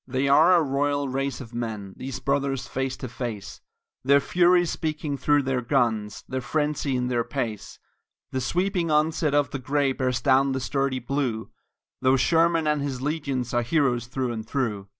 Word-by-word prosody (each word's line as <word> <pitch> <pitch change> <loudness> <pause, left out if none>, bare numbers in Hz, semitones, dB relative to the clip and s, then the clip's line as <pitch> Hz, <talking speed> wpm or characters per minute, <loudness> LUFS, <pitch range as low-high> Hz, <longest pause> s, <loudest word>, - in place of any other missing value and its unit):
They 130 +2 0
are 160 +6 +6
a 170 - +4
royal 145 0 0
race 135 0 -2
of 120 -2 -11
men, 110 -5 -4
these 130 0 -6
brothers 135 -1 -1
face 135 0 -3
to 130 - -6
face, 115 -4 -6 0.4
Their 140 +2 +5
fury 175 +4 +3
speaking 155 -3 -3
through 145 +1 +2
their 130 -1 -1
guns, 115 -5 0
their 130 0 -3
frenzy 150 0 -1
in 125 0 0
their 120 -2 0
pace; 115 -6 -4 0.5
The 130 - -2
sweeping 180 - 0
onset 155 -1 +2
of 145 -1 +2
the 135 - -4
Gray 140 +2 +1
bears 130 -2 -1
down 135 0 +3
the 130 - -1
sturdy 135 0 -1
Blue, 125 -3 -2 0.5
Though 130 +1 +4
Sherman 165 +3 +3
and 150 -1 +1
his 135 -3 -3
legions 140 -5 -2
are 120 - +2
heroes 120 -2 +1
through 130 -1 -2
and 110 -2 -4
through. 110 -5 -2
135 Hz, 175 wpm, -25 LUFS, 125-145 Hz, 0.5 s, are